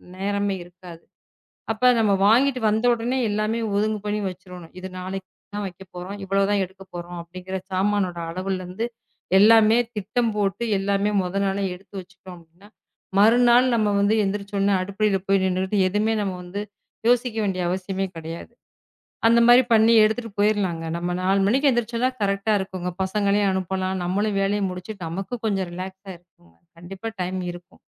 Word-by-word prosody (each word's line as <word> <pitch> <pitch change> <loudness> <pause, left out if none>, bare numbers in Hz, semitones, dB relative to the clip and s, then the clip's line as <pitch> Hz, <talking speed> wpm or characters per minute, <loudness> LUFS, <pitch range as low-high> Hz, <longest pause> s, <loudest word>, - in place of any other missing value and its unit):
நேரமே 200 +1 -1
இருக்காது. 175 -1 -13 0.7
அப்ப 250 +3 +3
நாம 215 -3 +3
வாங்கிட்டு 255 +4 +4
வந்தவுடனே 235 +3 +1
எல்லாமே 215 +2 -1 0.2
ஒதுங்கு 215 +1 +1
பண்ணி 210 0 -1
வச்சிறனும். 180 -2 -11
இது 190 - -6
நாளைக்கு 190 +1 -5 0.3
தான் 205 - -3
வைக்கப்போறோம். 185 +1 -9
இவ்வளவு 195 +1 +1
தான் 205 -1 +2
எடுக்கப்போறோம் 175 -2 -9
அப்படிங்கற 185 +2 -7 0.2
சாமானோட 190 -2 0
அளவுல 185 +2 -3
இருந்து 185 +6 -4 0.5
எல்லாமே 220 +1 +6 0.2
திட்டம் 220 +3 -1
போட்டு 200 +2 0
எல்லாமே 200 +1 0
மொத 180 +1 -4
நாளே 195 +1 -1
எடுத்து 195 +3 -17
வச்சிட்டோம் 185 0 -13
அப்டின்ன, 170 +4 -20 0.5
மறுநாள் 240 +4 +6
நம்ம 215 -2 +2
வந்து 200 +2 +3
எந்திருச்சு 200 +1 -3
உடனே 200 0 +2
அடுப்புல 200 +1 0
போய் 195 -1 +3
நின்னுட்டு 190 +2 -1
எதுவுமே 210 +3 +1
நம்ம 195 -2 -2
வந்து 195 +4 -5 0.5
யோசிக்க 245 -1 +2
வேண்டிய 185 -2 -1
அவசியமே 190 +1 -2
கிடையாது. 165 +5 -8 0.8
அந்த 235 +1 +5
மாரி 245 +2 +8
பண்ணி 225 +1 +5
எடுத்துட்டு 220 +1 0
போயிரலாம். 205 -5 +1 0.2
நம்ம 175 +1 -2
4 195 +1 +2
மணிக்கு 270 +7 +3
எந்திருச்சு 235 -1 -1
தான் 255 0 -1
கரெக்ட்டா 200 +1 +1
இருக்கும்ங்க. 185 -2 -4
பசங்களையும் 200 +1 +1
அனுப்பலாம். 190 0 -2
நம்மளும் 200 +3 0
வேலையை 200 +1 0
முடிச்சுட்டு 180 0 -7
நமக்கும் 195 +8 -5
கொஞ்சம் 195 -4 -1
ரிலக்ஸ்ஸா 190 +2 -7
இருக்கும். 85 - -28 0.2
கண்டிப்பா 195 +6 -7
டைம் 185 +1 -2
இருக்கும். 175 0 -14
195 Hz, 150 wpm, -23 LUFS, 185-215 Hz, 0.8 s, மாரி